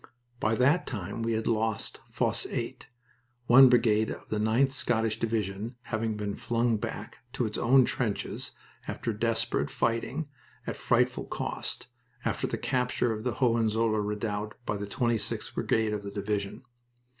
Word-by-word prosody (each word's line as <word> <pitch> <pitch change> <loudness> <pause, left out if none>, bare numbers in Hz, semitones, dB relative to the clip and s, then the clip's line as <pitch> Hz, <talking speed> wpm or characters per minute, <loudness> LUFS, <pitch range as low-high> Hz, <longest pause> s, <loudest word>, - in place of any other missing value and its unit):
By 110 +1 +2
that 140 +9 +3
time 100 -1 -4
we 115 0 0
had 110 0 -1
lost 110 -2 0
Fosse - - 0
8, - - -4 0.6
one 130 +2 +9
brigade 110 -3 +4
of - - -7
the 110 - -1
9th 115 +6 +3
Scottish 115 -4 0
Division 110 0 -2
having 110 -2 -2
been 105 -1 -3
flung 120 -1 +1
back 105 - -6
to 125 - 0
its 105 -1 -3
own 130 +2 +6
trenches 115 -5 -2 0.3
after 115 - -2
desperate 115 +2 0
fighting, 115 +7 -1 0.4
at - - -3
frightful - - +1
cost, - - -3 0.4
after - - 0
the - - -2
capture 125 -2 0
of 110 0 -5
the 125 - 0
Hohenzollern 115 -3 +2
redoubt 105 0 -3
by 105 - -1
the 100 0 -4
26th 120 +1 -1
Brigade 110 -1 +1
of 105 - -2
that 100 0 -8
division. 100 -1 -2
110 Hz, 150 wpm, -29 LUFS, 105-120 Hz, 0.6 s, one